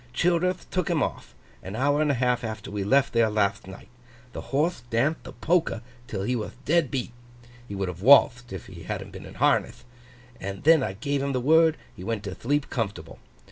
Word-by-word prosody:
Childerth 180 Hz, +1 st, +1 dB
took 185 Hz, 0 st, -1 dB
him 160 Hz, -6 st, +2 dB
off, -, -, -5 dB, 0.3 s
an 95 Hz, +3 st, -7 dB
hour 145 Hz, +5 st, +2 dB
and 155 Hz, -, +2 dB
a 140 Hz, -, +2 dB
half 125 Hz, 0 st, +1 dB
after 110 Hz, -2 st, -5 dB
we 100 Hz, -1 st, -2 dB
left 135 Hz, +7 st, +3 dB
there 115 Hz, -1 st, +3 dB
latht 100 Hz, -3 st, 0 dB
night. 95 Hz, 0 st, -11 dB, 0.5 s
The -, -, -5 dB
horthe 150 Hz, 0 st, 0 dB
danthed 135 Hz, +7 st, +1 dB
the -, -, -8 dB
polka 165 Hz, -9 st, 0 dB, 0.3 s
till 95 Hz, -4 st, -4 dB
he 125 Hz, +5 st, 0 dB
wath 110 Hz, -3 st, -4 dB
dead 165 Hz, -2 st, +2 dB
beat 130 Hz, -3 st, -3 dB, 0.6 s
(he 100 Hz, -, -6 dB
would 95 Hz, -1 st, -2 dB
have 90 Hz, 0 st, -6 dB
walthed 120 Hz, -1 st, +6 dB
if 95 Hz, -3 st, -7 dB
he -, -, -11 dB
hadn't -, -, -5 dB
been -, -, -10 dB
in -, -, -12 dB
harneth), 120 Hz, +1 st, +1 dB, 0.6 s
and 100 Hz, 0 st, -6 dB
then 160 Hz, -1 st, +6 dB
I 105 Hz, -7 st, -2 dB
gave 140 Hz, +7 st, -2 dB
him 140 Hz, 0 st, -1 dB
the 130 Hz, -, 0 dB
word 160 Hz, +4 st, +4 dB
and -, -, -24 dB
he 90 Hz, -, -8 dB
went 110 Hz, 0 st, -3 dB
to 100 Hz, -3 st, -5 dB
thleep 145 Hz, +8 st, -1 dB
comfortable. 110 Hz, -4 st, -4 dB
125 Hz, 215 wpm, -26 LUFS, 105-145 Hz, 0.6 s, walthed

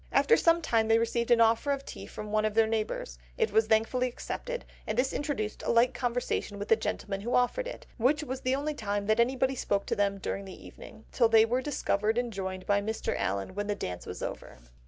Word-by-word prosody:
After 460 Hz, -, +5 dB
some 335 Hz, -3 st, +3 dB
time 225 Hz, -5 st, +2 dB
they 225 Hz, 0 st, +5 dB
received 235 Hz, +1 st, 0 dB
an 235 Hz, -1 st, +5 dB
offer 230 Hz, +5 st, +3 dB
of 275 Hz, -1 st, -2 dB
tea -, -, -8 dB
from 210 Hz, 0 st, -7 dB
one 215 Hz, 0 st, +2 dB
of 215 Hz, -1 st, -1 dB
their 225 Hz, 0 st, +5 dB
neighbours; 215 Hz, -, -3 dB, 0.2 s
it -, -, +1 dB
was 220 Hz, +1 st, +3 dB
thankfully 225 Hz, +3 st, +2 dB
accepted, -, -, -5 dB, 0.2 s
and 215 Hz, -, -2 dB
this 260 Hz, +2 st, +1 dB
introduced 270 Hz, -8 st, -3 dB
a -, -, -4 dB
light 235 Hz, +2 st, +4 dB
conversation 245 Hz, -4 st, -2 dB
with 205 Hz, +1 st, -6 dB
the 225 Hz, -, +7 dB
gentleman 200 Hz, -2 st, -3 dB
who 240 Hz, +4 st, -1 dB
offered 370 Hz, -, +1 dB
it, -, -, -8 dB
which 275 Hz, +6 st, +2 dB
was 260 Hz, -2 st, -5 dB
the 255 Hz, +1 st, +1 dB
only 295 Hz, +2 st, -2 dB
time 205 Hz, -6 st, -2 dB
that 215 Hz, +2 st, +2 dB
anybody 260 Hz, +2 st, +2 dB
spoke 200 Hz, -5 st, -1 dB
to -, -, -1 dB
them 200 Hz, -1 st, +1 dB
during 195 Hz, +1 st, -4 dB
the 190 Hz, -, -11 dB
evening, 220 Hz, 0 st, -13 dB
till 235 Hz, -3 st, +3 dB
they 225 Hz, -1 st, +6 dB
were 245 Hz, +3 st, 0 dB
discovered 220 Hz, -6 st, 0 dB
and 240 Hz, -2 st, -1 dB
joined 190 Hz, -1 st, -4 dB
by 205 Hz, 0 st, +2 dB
Mr. 220 Hz, +2 st, -2 dB
Allen 100 Hz, -, -2 dB
when 205 Hz, +1 st, -3 dB
the 205 Hz, -, 0 dB
dance 90 Hz, -, -5 dB
was -, -, -6 dB
over. -, -, -6 dB
225 Hz, 230 wpm, -29 LUFS, 205-255 Hz, 0.2 s, the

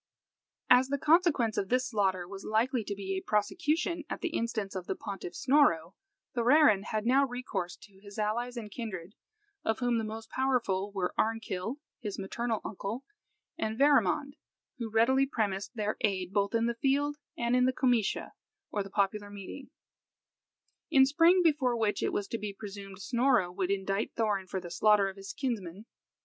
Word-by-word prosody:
As 250 Hz, +1 st, +7 dB
the 280 Hz, +1 st, -1 dB
consequence 305 Hz, -, +3 dB
of 195 Hz, -, -3 dB
this 255 Hz, +1 st, +2 dB
slaughter 190 Hz, -5 st, +1 dB
was 195 Hz, +1 st, -8 dB
likely 230 Hz, +3 st, +1 dB
to 200 Hz, -, -3 dB
be 195 Hz, -1 st, -4 dB
a 190 Hz, -, -6 dB
prosecution 320 Hz, -, 0 dB
at -, -, -4 dB
the 350 Hz, -, -1 dB
instance 230 Hz, -8 st, -2 dB
of 185 Hz, -2 st, -5 dB
the -, -, -1 dB
pontiff 195 Hz, -3 st, -7 dB
Snorro, 195 Hz, -, +3 dB, 0.4 s
Thorarin 240 Hz, -4 st, +5 dB
had 215 Hz, -1 st, -2 dB
now 265 Hz, +3 st, +5 dB
recourse 215 Hz, -8 st, -4 dB
to 195 Hz, -2 st, -17 dB
his 200 Hz, +1 st, -12 dB
allies 235 Hz, +4 st, -1 dB
and 215 Hz, -3 st, -6 dB
kindred, 200 Hz, -5 st, -6 dB, 0.5 s
of 220 Hz, 0 st, 0 dB
whom 245 Hz, -2 st, +1 dB
the -, -, -2 dB
most 220 Hz, +1 st, -7 dB
powerful 235 Hz, -7 st, 0 dB
were 190 Hz, -3 st, -2 dB
Arnkill, 220 Hz, 0 st, -1 dB, 0.2 s
his 210 Hz, -6 st, -5 dB
maternal 225 Hz, +3 st, -2 dB
uncle, 220 Hz, +5 st, -5 dB, 0.5 s
and 220 Hz, 0 st, -2 dB
Verimond, 285 Hz, +1 st, +3 dB, 0.4 s
who 230 Hz, -2 st, -3 dB
readily 260 Hz, +5 st, +3 dB
premised 205 Hz, -3 st, -2 dB
their 215 Hz, -1 st, -1 dB
aid 190 Hz, -2 st, 0 dB
both 200 Hz, +2 st, +1 dB
in 230 Hz, 0 st, +2 dB
the 235 Hz, -, +1 dB
field 280 Hz, +4 st, +1 dB, 0.2 s
and 235 Hz, +1 st, +1 dB
in 250 Hz, 0 st, +4 dB
the 255 Hz, -, +3 dB
Comitia, 245 Hz, -5 st, +1 dB, 0.4 s
or 205 Hz, -, -1 dB
popular 205 Hz, +1 st, 0 dB
meeting, 205 Hz, +7 st, -9 dB, 1.2 s
in 265 Hz, -1 st, +6 dB
spring, 330 Hz, +6 st, +5 dB
before 280 Hz, -7 st, +2 dB
which 215 Hz, -2 st, 0 dB
it -, -, 0 dB
was 205 Hz, -, -2 dB
to 230 Hz, -, -3 dB
be 210 Hz, -1 st, -4 dB
presumed 200 Hz, -2 st, -8 dB
Snorro 235 Hz, -4 st, +2 dB
would 185 Hz, 0 st, -2 dB
indict 195 Hz, +1 st, -1 dB
Thorarin 205 Hz, -4 st, 0 dB
for 190 Hz, -, -3 dB
the 175 Hz, -2 st, -9 dB
slaughter 210 Hz, +1 st, +4 dB
of 190 Hz, -, -9 dB
his 195 Hz, 0 st, -7 dB
kinsman. 210 Hz, -7 st, -4 dB
220 Hz, 170 wpm, -30 LUFS, 195-255 Hz, 1.2 s, As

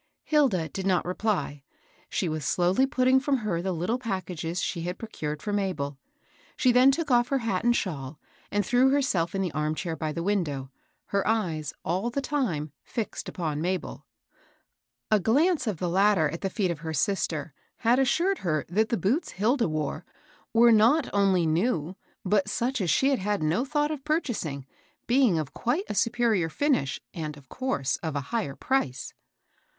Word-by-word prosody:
Hilda 255 Hz, -, +2 dB
did 190 Hz, +5 st, -4 dB
not 185 Hz, -2 st, +2 dB
reply. 180 Hz, -6 st, -1 dB, 0.5 s
She 185 Hz, -, -1 dB
was 155 Hz, -2 st, -3 dB
slowly 180 Hz, -, +2 dB
putting 260 Hz, -1 st, +3 dB
from 275 Hz, 0 st, +1 dB
her 170 Hz, -5 st, 0 dB
the 190 Hz, +1 st, -2 dB
little 180 Hz, +9 st, -1 dB
packages 180 Hz, -6 st, -3 dB
she 170 Hz, -, -2 dB
had 180 Hz, +2 st, -4 dB
procured 150 Hz, -9 st, -5 dB
for 205 Hz, -, -2 dB
Mabel. 165 Hz, -9 st, -2 dB, 0.6 s
She 255 Hz, -, +4 dB
then 250 Hz, +2 st, +6 dB
took 290 Hz, +1 st, 0 dB
off 240 Hz, 0 st, +4 dB
her 275 Hz, -, +1 dB
hat 225 Hz, -7 st, -1 dB
and 240 Hz, 0 st, +3 dB
shawl, 145 Hz, -, -3 dB, 0.3 s
and 205 Hz, 0 st, 0 dB
threw 250 Hz, +2 st, +4 dB
herself 200 Hz, -12 st, +1 dB
in 195 Hz, -, 0 dB
the 180 Hz, -, -2 dB
arm 155 Hz, +1 st, -1 dB
chair 165 Hz, 0 st, -3 dB
by 155 Hz, -1 st, -3 dB
the 170 Hz, +2 st, -4 dB
window, 150 Hz, -10 st, -1 dB, 0.4 s
her 200 Hz, -1 st, 0 dB
eyes, 175 Hz, -9 st, 0 dB
all 185 Hz, +8 st, 0 dB
the 245 Hz, -, -2 dB
time, 240 Hz, -, -1 dB
fixed 225 Hz, -3 st, -4 dB
upon 155 Hz, -5 st, -3 dB
Mabel. 180 Hz, +1 st, -3 dB, 1.0 s
A 215 Hz, -, +5 dB
glance 285 Hz, -, +2 dB
of 205 Hz, -5 st, -1 dB
the 180 Hz, -, -2 dB
latter 190 Hz, -2 st, +3 dB
at 165 Hz, +3 st, -6 dB
the 195 Hz, -, -1 dB
feet 190 Hz, -2 st, 0 dB
of 165 Hz, -, -5 dB
her 160 Hz, 0 st, -4 dB
sister 160 Hz, -5 st, -1 dB, 0.2 s
had 240 Hz, +3 st, +3 dB
assured 335 Hz, +8 st, +2 dB
her 155 Hz, -5 st, -1 dB
that 215 Hz, +5 st, +1 dB
the 230 Hz, -, +1 dB
boots 225 Hz, -, 0 dB
Hilda 230 Hz, -, +1 dB
wore 155 Hz, +1 st, -3 dB, 0.5 s
were 235 Hz, +1 st, +6 dB
not 235 Hz, +7 st, +4 dB
only 195 Hz, -4 st, +3 dB
new, 165 Hz, 0 st, 0 dB, 0.3 s
but 195 Hz, +1 st, +2 dB
such 240 Hz, +3 st, -1 dB
as 180 Hz, -, 0 dB
she 270 Hz, -, +3 dB
had 270 Hz, -, +1 dB
had 205 Hz, -3 st, -1 dB
no 165 Hz, +11 st, +1 dB
thought 295 Hz, +1 st, 0 dB
of 295 Hz, -3 st, -5 dB
purchasing, 240 Hz, -, -2 dB, 0.4 s
being 245 Hz, -7 st, +3 dB
of 155 Hz, -4 st, -3 dB
quite 290 Hz, -, -1 dB
a -, -, -3 dB
superior 225 Hz, -6 st, +1 dB
finish 255 Hz, -, 0 dB
and, 155 Hz, -3 st, -5 dB
of 135 Hz, -2 st, -17 dB
course, 255 Hz, -, -1 dB
of 160 Hz, -3 st, -4 dB
a 145 Hz, -, 0 dB
higher 215 Hz, -13 st, -1 dB
price. 260 Hz, -, -1 dB
195 Hz, 180 wpm, -27 LUFS, 160-245 Hz, 1.0 s, then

